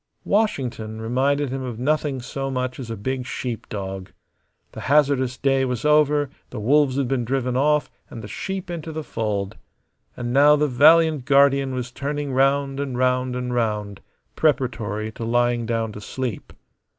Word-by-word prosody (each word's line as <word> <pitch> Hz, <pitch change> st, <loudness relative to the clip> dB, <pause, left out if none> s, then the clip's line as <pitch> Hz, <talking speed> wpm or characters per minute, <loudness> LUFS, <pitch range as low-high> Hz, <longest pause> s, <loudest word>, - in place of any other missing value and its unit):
Washington 125 Hz, -, -1 dB
reminded 135 Hz, +5 st, 0 dB
him 135 Hz, 0 st, -3 dB
of 125 Hz, -3 st, -5 dB
nothing 140 Hz, 0 st, -1 dB
so 135 Hz, +2 st, -4 dB
much 130 Hz, 0 st, -3 dB
as 125 Hz, -4 st, -6 dB
a 115 Hz, -, -3 dB
big 130 Hz, +3 st, -3 dB
sheep 120 Hz, -3 st, -5 dB
dog. 95 Hz, -2 st, -5 dB, 0.6 s
The -, -, -9 dB
hazardous 135 Hz, -3 st, +3 dB
day 135 Hz, -1 st, +2 dB
was 125 Hz, 0 st, -2 dB
over; 150 Hz, -2 st, +3 dB, 0.2 s
the 120 Hz, -, -6 dB
wolves 135 Hz, +4 st, +3 dB
had 140 Hz, -2 st, 0 dB
been 130 Hz, -1 st, 0 dB
driven 125 Hz, +1 st, -1 dB
off 150 Hz, +3 st, +2 dB, 0.2 s
and 115 Hz, -, -9 dB
the -, -, -7 dB
sheep 190 Hz, -, -5 dB
into 165 Hz, -2 st, -5 dB
the 155 Hz, 0 st, -5 dB
fold; 105 Hz, -6 st, -3 dB, 0.6 s
and 120 Hz, -1 st, -3 dB
now 145 Hz, +2 st, +6 dB
the 150 Hz, 0 st, +1 dB
valiant 155 Hz, +1 st, +5 dB
guardian 140 Hz, -1 st, +4 dB
was 125 Hz, -1 st, -4 dB
turning 145 Hz, +1 st, -3 dB
round 135 Hz, +1 st, +2 dB
and 135 Hz, -3 st, -3 dB
round 125 Hz, 0 st, +1 dB
and 125 Hz, 0 st, -3 dB
round 105 Hz, -4 st, -2 dB, 0.3 s
preparatory 115 Hz, -7 st, 0 dB
to 115 Hz, -, -8 dB
lying 120 Hz, 0 st, +1 dB
down 115 Hz, -1 st, -1 dB
to 105 Hz, -, -9 dB
sleep. 125 Hz, 0 st, -5 dB
130 Hz, 165 wpm, -23 LUFS, 120-140 Hz, 0.6 s, now